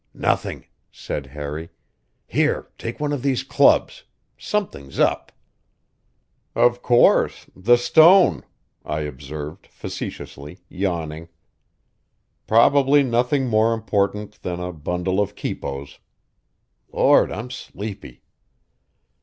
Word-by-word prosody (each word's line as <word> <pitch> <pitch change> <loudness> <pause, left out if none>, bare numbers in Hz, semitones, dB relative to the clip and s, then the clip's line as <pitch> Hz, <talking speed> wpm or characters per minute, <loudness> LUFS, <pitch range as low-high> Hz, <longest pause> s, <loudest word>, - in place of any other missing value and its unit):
"Nothing," - - -1 0.3
said 70 -2 -6
Harry. 75 +3 -6 0.6
"Here, - - 0
take 115 - -6
one 150 0 -1
of 140 - -3
these 135 -2 0
clubs. - - +3 0.3
Something's 125 - -4
up." - - +1 1.2
"Of 120 0 +3
course 120 -1 +3
the 120 +6 +4
stone," 160 - +5 0.4
I 75 +1 -3
observed 75 +3 -7
facetiously, 75 +5 -8
yawning. 85 -4 -4 1.2
"Probably 140 +5 +5
nothing 125 +2 +1
more 115 0 +2
important 105 -1 -2
than 90 -1 -4
a 90 0 -5
bundle 90 +4 -2
of 105 0 -1
quipos. 70 +1 -6 0.9
Lord, - - +4
I'm 115 +7 -6
sleepy!" 105 - -8
100 Hz, 95 wpm, -22 LUFS, 75-120 Hz, 1.2 s, stone